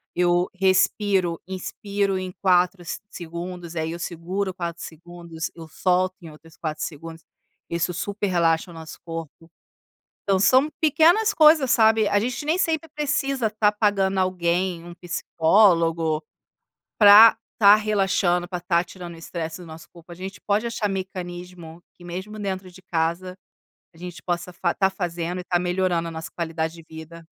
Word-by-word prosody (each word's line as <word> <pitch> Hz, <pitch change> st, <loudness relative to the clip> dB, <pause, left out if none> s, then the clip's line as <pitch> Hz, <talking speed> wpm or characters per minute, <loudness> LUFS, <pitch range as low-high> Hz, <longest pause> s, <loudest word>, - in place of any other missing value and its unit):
eu 175 Hz, 0 st, +2 dB
respiro, 190 Hz, -1 st, +1 dB
inspiro 195 Hz, +1 st, -2 dB
em 185 Hz, 0 st, -5 dB
4 180 Hz, -1 st, +2 dB
s 170 Hz, -, -5 dB
segundos 175 Hz, 0 st, -7 dB
aí 160 Hz, 0 st, -2 dB
eu 170 Hz, -, -6 dB
seguro 185 Hz, +3 st, -3 dB
4 170 Hz, -2 st, -5 dB
segundos 170 Hz, 0 st, -8 dB
eu 165 Hz, -1 st, -10 dB
solto 185 Hz, +3 st, 0 dB
em 165 Hz, -, -10 dB
outros 160 Hz, +2 st, -16 dB
4 155 Hz, -3 st, -4 dB
segundos, 165 Hz, +1 st, -7 dB, 0.5 s
isso 170 Hz, +1 st, -1 dB
super 205 Hz, +3 st, -3 dB
relaxa 170 Hz, -1 st, +1 dB
o -, -, -11 dB
nosso 160 Hz, -1 st, -10 dB
corpo. 165 Hz, 0 st, -8 dB, 0.7 s
Então 195 Hz, -1 st, +1 dB
são 260 Hz, +9 st, +4 dB
pequenas 340 Hz, +8 st, +4 dB
coisas, 305 Hz, -7 st, +5 dB
sabe, 220 Hz, -2 st, +4 dB
a 205 Hz, -, +2 dB
gente 245 Hz, +5 st, -3 dB
nem 315 Hz, +4 st, +1 dB
sempre 325 Hz, -3 st, 0 dB
precisa 275 Hz, -5 st, 0 dB
tá 210 Hz, -1 st, +2 dB
pagando 200 Hz, -2 st, +1 dB
alguém 180 Hz, -1 st, 0 dB
um 175 Hz, -, -9 dB
psicólogo 165 Hz, -2 st, +2 dB, 0.8 s
pra 215 Hz, +2 st, +9 dB, 0.2 s
tá 205 Hz, -2 st, +7 dB
relaxando, 195 Hz, -4 st, +1 dB
pra 180 Hz, -1 st, -4 dB
tá 175 Hz, -1 st, +1 dB
tirando 175 Hz, -1 st, -10 dB
o -, -, -12 dB
estresse 165 Hz, 0 st, -6 dB
do 175 Hz, -, -11 dB
nosso 160 Hz, 0 st, -12 dB
corpo, 170 Hz, 0 st, -17 dB
a -, -, -7 dB
gente 190 Hz, +3 st, -8 dB
pode 210 Hz, +3 st, 0 dB
achar 230 Hz, -3 st, -2 dB
mecanismo 180 Hz, -3 st, -7 dB, 0.2 s
que 175 Hz, -, -16 dB
mesmo 190 Hz, +5 st, -7 dB
dentro 190 Hz, -2 st, -4 dB
de 185 Hz, +1 st, -16 dB
casa 175 Hz, +2 st, -2 dB, 0.6 s
a -, -, -18 dB
gente 175 Hz, 0 st, -9 dB
possa 175 Hz, 0 st, -3 dB, 0.3 s
tá 190 Hz, -1 st, +3 dB
fazendo 175 Hz, -2 st, -4 dB
e -, -, -6 dB
tá 175 Hz, -, +1 dB
melhorando 180 Hz, -1 st, 0 dB
a -, -, -8 dB
nossa 160 Hz, 0 st, -7 dB
qualidade 160 Hz, -1 st, -3 dB
de 165 Hz, -, -13 dB
vida. 160 Hz, +1 st, -11 dB
180 Hz, 160 wpm, -23 LUFS, 170-200 Hz, 0.8 s, pra